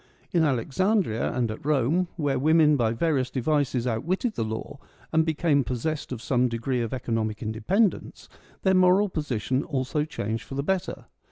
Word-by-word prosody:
In 170 Hz, -2 st, +3 dB
Alexandria 145 Hz, -, +1 dB
and 120 Hz, -3 st, -1 dB
at 110 Hz, -, -8 dB
Rome, 150 Hz, +5 st, +1 dB
where 145 Hz, -5 st, 0 dB
women 155 Hz, +1 st, +4 dB
by 115 Hz, -5 st, +1 dB
various 130 Hz, 0 st, 0 dB
devices 135 Hz, -2 st, 0 dB
outwitted 170 Hz, -, -1 dB
the -, -, -2 dB
law 110 Hz, +5 st, -5 dB, 0.3 s
and 160 Hz, 0 st, +4 dB
became 155 Hz, -2 st, +1 dB
possessed 130 Hz, +6 st, -3 dB
of 120 Hz, -3 st, -5 dB
some 125 Hz, -1 st, +2 dB
degree 120 Hz, +2 st, -1 dB
of 115 Hz, -, -3 dB
economic 115 Hz, -4 st, -2 dB
independence, 180 Hz, -, 0 dB, 0.4 s
their 190 Hz, -, +4 dB
moral 185 Hz, +2 st, +4 dB
position 135 Hz, -4 st, -1 dB
also 140 Hz, +1 st, -1 dB
changed 110 Hz, -7 st, -4 dB
for 135 Hz, -, -8 dB
the 140 Hz, -, -1 dB
better. 190 Hz, +3 st, -2 dB
140 Hz, 160 wpm, -26 LUFS, 120-160 Hz, 0.4 s, women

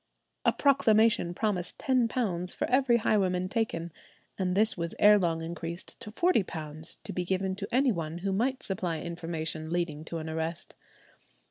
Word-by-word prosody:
A -, -, +5 dB
proclamation 225 Hz, -9 st, +3 dB
promised 195 Hz, -5 st, -2 dB
£10 230 Hz, -8 st, 0 dB
for -, -, -2 dB
every 255 Hz, -2 st, +4 dB
highwayman 185 Hz, -5 st, +1 dB
taken, 180 Hz, -7 st, -2 dB, 0.4 s
and 185 Hz, -1 st, -1 dB
this 220 Hz, +2 st, +8 dB
was 170 Hz, -1 st, -4 dB
ere 210 Hz, 0 st, +6 dB
long 165 Hz, -3 st, -1 dB
increased 170 Hz, +1 st, -5 dB
to 210 Hz, -, -8 dB
£40, 165 Hz, -, -1 dB
to -, -, -6 dB
be 180 Hz, -, -2 dB
given 190 Hz, +1 st, -1 dB
to 200 Hz, 0 st, -4 dB
any 260 Hz, +1 st, +3 dB
one 165 Hz, -4 st, -4 dB
who 195 Hz, +3 st, -2 dB
might 255 Hz, +6 st, 0 dB
supply 180 Hz, -4 st, -2 dB
information 165 Hz, -2 st, -4 dB
leading 165 Hz, -3 st, -2 dB
to 165 Hz, -, -5 dB
an 160 Hz, 0 st, -5 dB
arrest. 160 Hz, +1 st, -4 dB
180 Hz, 155 wpm, -29 LUFS, 165-220 Hz, 0.4 s, this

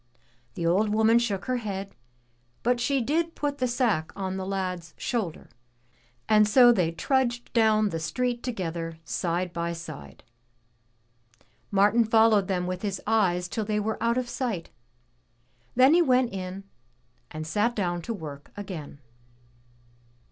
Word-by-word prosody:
The 170 Hz, -, -3 dB
old 195 Hz, +6 st, +3 dB
woman 220 Hz, +2 st, +4 dB
shook 205 Hz, -5 st, -2 dB
her 255 Hz, -1 st, 0 dB
head, 200 Hz, -4 st, -5 dB, 0.7 s
but 245 Hz, +1 st, +2 dB
she 270 Hz, +2 st, +1 dB
did 325 Hz, +7 st, 0 dB
put 290 Hz, -1 st, -2 dB
the 255 Hz, -, +1 dB
sack 235 Hz, -10 st, 0 dB
on 190 Hz, -1 st, -3 dB
the 190 Hz, 0 st, -4 dB
lad's 185 Hz, -3 st, -4 dB
shoulder. 215 Hz, -10 st, -3 dB, 0.8 s
And 215 Hz, -1 st, +5 dB
so 240 Hz, +3 st, +7 dB
they 180 Hz, -8 st, +1 dB
trudged 245 Hz, +5 st, -1 dB
down 215 Hz, -2 st, +3 dB
the 165 Hz, -, -3 dB
street 245 Hz, +8 st, -2 dB
together, 170 Hz, -8 st, -4 dB
side 175 Hz, +2 st, -2 dB
by 170 Hz, 0 st, -2 dB
side. 75 Hz, -, -9 dB, 1.5 s
Martin 205 Hz, +4 st, +4 dB
followed 220 Hz, -3 st, +4 dB
them 180 Hz, -2 st, -1 dB
with 180 Hz, 0 st, -4 dB
his 200 Hz, -3 st, -2 dB
eyes 185 Hz, -5 st, +2 dB
till 220 Hz, +4 st, -3 dB
they 210 Hz, 0 st, -1 dB
were 215 Hz, +1 st, -3 dB
out 235 Hz, +1 st, +1 dB
of 255 Hz, -1 st, -1 dB
sight, 235 Hz, -9 st, -3 dB, 1.0 s
then 260 Hz, +4 st, +6 dB
he 350 Hz, -, +6 dB
went 255 Hz, -6 st, +2 dB
in 190 Hz, 0 st, -5 dB, 0.7 s
and 155 Hz, 0 st, -6 dB
sat 210 Hz, +9 st, 0 dB
down 175 Hz, -4 st, -1 dB
to 230 Hz, -, -5 dB
work 145 Hz, -6 st, -9 dB
again. 180 Hz, -8 st, -7 dB
210 Hz, 145 wpm, -27 LUFS, 180-240 Hz, 1.5 s, so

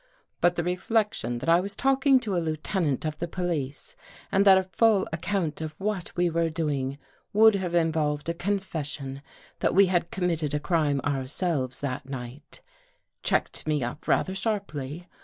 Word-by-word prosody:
But 175 Hz, 0 st, +3 dB
the 170 Hz, -, -1 dB
reflection 180 Hz, -, 0 dB
that 125 Hz, -, -6 dB
I 165 Hz, +1 st, +6 dB
was 200 Hz, +2 st, -3 dB
talking 270 Hz, +1 st, +4 dB
to 205 Hz, -5 st, -2 dB
a 175 Hz, -, +1 dB
lieutenant 155 Hz, -1 st, -1 dB
of 155 Hz, -1 st, -3 dB
the 170 Hz, -, -2 dB
police 170 Hz, -, -3 dB, 0.4 s
and 195 Hz, +1 st, +3 dB
that 195 Hz, -1 st, +8 dB
a 190 Hz, -, +2 dB
full 200 Hz, +1 st, +2 dB
account 165 Hz, -2 st, -2 dB
of 155 Hz, -1 st, -5 dB
what 200 Hz, -3 st, -3 dB
we 175 Hz, 0 st, +3 dB
were 165 Hz, 0 st, +1 dB
doing 145 Hz, -4 st, -2 dB, 0.4 s
would 220 Hz, +1 st, +7 dB
have 185 Hz, -3 st, -2 dB
involved 155 Hz, -3 st, +1 dB
a 170 Hz, -, 0 dB
con 200 Hz, +4 st, 0 dB
fession 145 Hz, -7 st, -4 dB, 0.4 s
that -, -, +1 dB
we 200 Hz, +1 st, +7 dB
had 175 Hz, -2 st, 0 dB
committed 165 Hz, -5 st, -1 dB
a -, -, +1 dB
crime 150 Hz, -4 st, +1 dB
ourselves 135 Hz, 0 st, -1 dB
that 135 Hz, -1 st, -4 dB
night, 130 Hz, +2 st, -8 dB, 0.6 s
checked -, -, 0 dB
me 150 Hz, -4 st, +1 dB
up 120 Hz, +5 st, -6 dB
rather 190 Hz, -, +2 dB
sharply. 180 Hz, -, -3 dB
170 Hz, 170 wpm, -27 LUFS, 145-190 Hz, 0.6 s, that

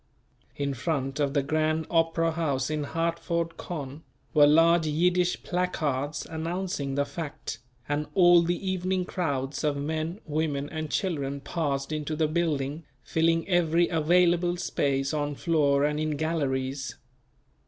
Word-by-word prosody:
In 140 Hz, -1 st, -1 dB
front 135 Hz, 0 st, -2 dB
of 140 Hz, 0 st, 0 dB
the 140 Hz, -, +3 dB
Grand 155 Hz, +2 st, 0 dB
Opera 165 Hz, 0 st, +2 dB
House 145 Hz, -4 st, -1 dB
in 150 Hz, -1 st, -1 dB
Hartford, 165 Hz, +1 st, -1 dB
Conn., 145 Hz, -3 st, -6 dB, 0.3 s
were 145 Hz, -2 st, +7 dB
large 165 Hz, +2 st, +5 dB
Yiddish 180 Hz, +3 st, +1 dB
placards 150 Hz, -6 st, -1 dB
announcing 165 Hz, -3 st, -3 dB
the 140 Hz, 0 st, +1 dB
fact, 145 Hz, -3 st, -6 dB, 0.3 s
and 145 Hz, +1 st, -1 dB
all 175 Hz, -2 st, +7 dB
the 175 Hz, +3 st, -2 dB
evening 185 Hz, 0 st, 0 dB
crowds 140 Hz, -7 st, -2 dB
of 150 Hz, -2 st, +1 dB
men, 160 Hz, +5 st, -3 dB
women 150 Hz, -2 st, -1 dB
and 155 Hz, -1 st, -4 dB
children 140 Hz, -7 st, -1 dB
passed 140 Hz, -1 st, -2 dB
into 155 Hz, 0 st, -2 dB
the 155 Hz, 0 st, +2 dB
building 155 Hz, -2 st, -1 dB, 0.2 s
filling 165 Hz, 0 st, +1 dB
every 175 Hz, -2 st, +3 dB
available 175 Hz, +2 st, +3 dB
space 135 Hz, -4 st, 0 dB
on 145 Hz, -1 st, -1 dB
floor 145 Hz, -4 st, +2 dB
and 150 Hz, 0 st, 0 dB
in 155 Hz, -1 st, -1 dB
galleries. 135 Hz, -4 st, -2 dB
155 Hz, 135 wpm, -27 LUFS, 145-170 Hz, 0.3 s, were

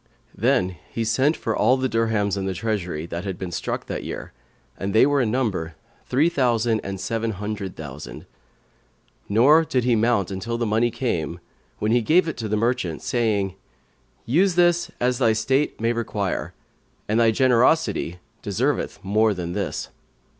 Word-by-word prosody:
Then 105 Hz, -7 st, +1 dB
he 115 Hz, -, -2 dB
sent 130 Hz, +8 st, +2 dB
for 110 Hz, -, -2 dB
all 125 Hz, +5 st, +3 dB
the 130 Hz, 0 st, 0 dB
dirhams 110 Hz, -4 st, 0 dB
in 95 Hz, -1 st, -3 dB
the 95 Hz, -, -2 dB
treasury, 90 Hz, -6 st, -2 dB
that 85 Hz, +1 st, -5 dB
had 95 Hz, -3 st, -4 dB
been 95 Hz, -2 st, -5 dB
struck -, -, -3 dB
that -, -, -4 dB
year -, -, -6 dB, 0.4 s
(and 100 Hz, +2 st, -4 dB
they 110 Hz, -, +7 dB
were 145 Hz, -1 st, +2 dB
in 115 Hz, -, +1 dB
number 105 Hz, -10 st, -1 dB, 0.3 s
three 140 Hz, +6 st, +3 dB
thousand 120 Hz, -7 st, +1 dB
and 95 Hz, -1 st, -5 dB
seven 115 Hz, +3 st, -2 dB
hundred 100 Hz, -1 st, -5 dB
thousand); 75 Hz, -2 st, -8 dB, 1.0 s
nor 135 Hz, +10 st, +6 dB
did 130 Hz, -6 st, 0 dB
he 120 Hz, -1 st, +3 dB
mount 110 Hz, -4 st, +1 dB
until 115 Hz, +5 st, -3 dB
the 120 Hz, -, -1 dB
money 110 Hz, +2 st, +2 dB
came, 90 Hz, -, -2 dB, 0.4 s
when 105 Hz, -, 0 dB
he 120 Hz, +1 st, +4 dB
gave 165 Hz, +9 st, +3 dB
it 160 Hz, -, -3 dB
to 115 Hz, -, -3 dB
the 105 Hz, 0 st, 0 dB
merchant, 115 Hz, -7 st, -1 dB
saying, 105 Hz, -6 st, 0 dB, 0.7 s
"Use 175 Hz, +8 st, +3 dB
this 175 Hz, -1 st, +3 dB
as 125 Hz, 0 st, +1 dB
thy 115 Hz, -4 st, +4 dB
state 135 Hz, +6 st, 0 dB
may 115 Hz, +1 st, +1 dB
require; 105 Hz, -4 st, -3 dB, 0.5 s
and 110 Hz, +2 st, +1 dB
thy 115 Hz, -1 st, +5 dB
generosity 125 Hz, -, +2 dB, 0.2 s
deserveth 120 Hz, +7 st, -1 dB
more 105 Hz, +2 st, +2 dB
than 85 Hz, -1 st, -4 dB
this." -, -, -3 dB
115 Hz, 170 wpm, -23 LUFS, 100-125 Hz, 1.0 s, they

